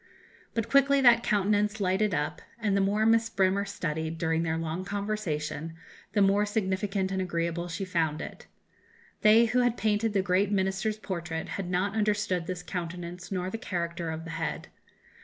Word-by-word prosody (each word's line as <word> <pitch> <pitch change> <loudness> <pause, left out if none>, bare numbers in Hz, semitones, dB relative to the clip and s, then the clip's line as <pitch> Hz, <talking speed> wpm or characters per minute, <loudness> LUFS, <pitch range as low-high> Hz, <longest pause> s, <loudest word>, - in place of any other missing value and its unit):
But 230 -2 0
quickly 275 0 +4
that 240 -2 +7
countenance 210 0 +1
lighted 195 +2 +1
up, 150 -4 -2 0.2
and 210 -4 0
the 200 - +3
more 205 +3 +2
Miss 225 0 +4
Bremer 195 0 +2
studied, 160 -4 -3
during 160 0 0
their 165 -1 -1
long 165 +2 -3
conversation, 170 -7 -3 0.4
the 205 -2 +4
more 200 +1 +4
significant 195 -2 -1
and 190 -1 -1
agreeable 170 -1 -2
she 175 +3 -4
found 165 -4 0
it. - - -8 0.7
They 220 +2 +7
who 240 +2 +1
had 245 -1 +2
painted 215 +1 +1
the 195 -2 +2
great 190 +2 +2
Minister's 195 +2 0
portrait 170 -6 -4
had 190 -3 -4
not 185 +3 0
understood 205 -5 0
this 180 -1 -4
countenance 175 0 -6
nor 185 -1 -2
the 225 - -4
character 170 -6 -3
of 160 0 -4
the 165 - -6
head. - - -4
190 Hz, 170 wpm, -28 LUFS, 170-210 Hz, 0.7 s, that